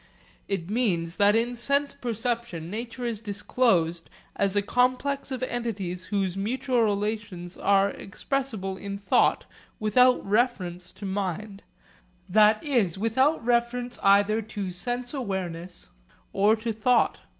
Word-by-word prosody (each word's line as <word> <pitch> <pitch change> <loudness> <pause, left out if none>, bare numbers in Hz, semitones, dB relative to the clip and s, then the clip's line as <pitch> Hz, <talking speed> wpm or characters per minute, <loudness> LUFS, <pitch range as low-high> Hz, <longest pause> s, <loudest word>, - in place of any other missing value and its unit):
It 190 -4 -2
means 180 -8 0
that 205 +1 +5
in 235 +2 +1
sense 280 +4 +1
perception 230 -7 -3
nature 235 +3 -5
is 230 -3 -2
disclosed 200 -5 0 0.3
as 200 0 +1
a 205 - +2
complex 255 +5 +1
of 260 -1 -4
entities 200 -8 -3
whose 195 -3 -1
mutual 245 +5 0
relations 205 -4 -2
are 200 0 +3
expressible 210 -3 -4
in 200 0 -5
thought 200 - +2 0.3
without 250 +4 +4
reference 190 -6 0
to 200 - -9
mind, 195 +1 -3 0.7
that 215 +2 +4
is, 235 - +1
without 250 +7 +1
reference 240 +1 0
either 205 +2 +4
to 205 -3 -5
sense 245 +7 -3
awareness 185 - -5 0.4
or 205 +3 +4
to 225 +1 -3
thought. 235 +3 +2
215 Hz, 125 wpm, -26 LUFS, 195-245 Hz, 0.7 s, that